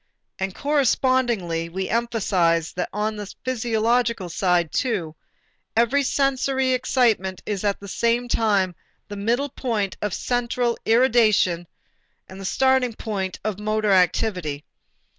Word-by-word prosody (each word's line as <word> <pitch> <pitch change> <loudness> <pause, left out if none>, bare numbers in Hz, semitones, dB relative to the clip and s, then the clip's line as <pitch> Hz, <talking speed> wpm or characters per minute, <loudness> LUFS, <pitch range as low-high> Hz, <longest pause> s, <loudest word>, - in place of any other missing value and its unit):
And 190 -1 -3
correspondingly 250 - +1
we 190 +2 -3
emphasized 190 -8 +1
that 180 - -2
on 210 +1 -2
the 205 -1 -6
physiological 235 -4 0
side 175 -2 +1
too, 185 -11 -1 0.6
every 235 +5 +3
sensory 270 -1 +1
excitement 235 -7 +1
is 205 -2 -3
at 200 -1 0
the 200 - -10
same 235 +4 0
time 205 -6 +1 0.4
the 205 - -6
middle 235 +8 0
point 220 -7 -2
of 205 -3 -2
central 245 -1 -1
irradiation 220 -7 +3 0.6
and 190 +1 -10
the - - -7
starting 260 +2 +2
point 195 -5 -4
of 210 -2 -3
motor 215 0 0
activity. 180 -5 +1
215 Hz, 120 wpm, -23 LUFS, 190-245 Hz, 0.6 s, every